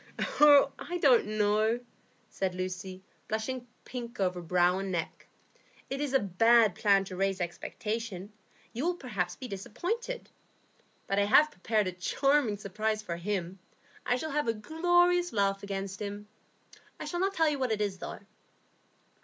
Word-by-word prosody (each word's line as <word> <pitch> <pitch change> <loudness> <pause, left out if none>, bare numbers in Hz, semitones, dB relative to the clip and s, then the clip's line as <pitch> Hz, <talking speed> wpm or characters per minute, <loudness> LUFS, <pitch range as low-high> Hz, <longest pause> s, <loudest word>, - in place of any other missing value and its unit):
"Oh, 285 -2 +7
I 355 - -4
don't 260 -10 +4
know," 215 +2 +2 0.5
said 190 -2 -3
Lucy, 185 0 -5 0.2
blushing 245 +3 -3 0.2
pink 240 -3 -7
over 180 -2 0
brow 180 +2 +2
and 195 -1 -3
neck. 170 -3 -4 0.6
"It 275 +1 -2
is 290 -3 -1
a - - +6
bad 220 +2 +4
plan 200 0 +3
to 185 - -7
raise 195 0 0
expectation; 205 +3 -4 0.4
you 245 - -3
will 355 - +1
perhaps 200 - -3
be 255 - -7
disappointed. 360 - -4 0.7
But 195 0 0
I 200 - +3
have 295 +8 +5
prepared 215 +1 0
a 185 - -1
charming 245 +6 +1
surprise 215 +2 -2
for 170 -4 -4
him; 185 0 -3 0.4
I 245 - +1
shall 315 +5 -4
have 295 -2 0
a 230 - +1
glorious 350 +7 +2
laugh 195 -2 +1
against 195 0 -5
him. 205 0 -5 0.7
I - - -5
shall 350 - -3
not 390 +1 0
tell 325 -1 +3
you 295 -2 0
what 255 -3 0
it 215 - 0
is, 200 -3 -2
though." - - -7
215 Hz, 160 wpm, -30 LUFS, 195-270 Hz, 0.7 s, Oh